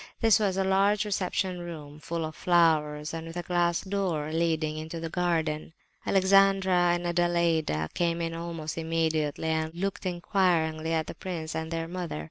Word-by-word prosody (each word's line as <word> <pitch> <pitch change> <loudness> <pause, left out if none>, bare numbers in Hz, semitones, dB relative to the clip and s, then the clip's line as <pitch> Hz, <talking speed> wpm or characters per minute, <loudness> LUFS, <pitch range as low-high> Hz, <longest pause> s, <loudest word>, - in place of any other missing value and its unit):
This 225 -2 +5
was 195 -3 0
a 195 - +2
large 195 +2 +2
reception 190 -2 -1
room, 155 -4 -8
full 165 +1 -3
of 155 0 -7
flowers, 155 -4 +2
and 165 0 -5
with 165 +1 -7
a 175 - -3
glass 175 -1 +1
door 185 -6 -2
leading 160 -2 0
into 160 +2 -5
the 165 -1 -5
garden. 165 -3 -1 0.3
Alexandra 190 -2 +4
and 175 0 -4
Adelaida 170 - +1
came 170 -1 0
in 165 -1 -2
almost 165 -1 -5
immediately, 160 -1 0
and 160 0 -1
looked 195 +1 -3
inquiringly 175 -3 +1
at 160 -1 +1
the - - -7
prince 165 -4 -5
and 160 0 -3
their 165 0 -3
mother. 175 -3 -4
170 Hz, 165 wpm, -28 LUFS, 160-180 Hz, 0.3 s, This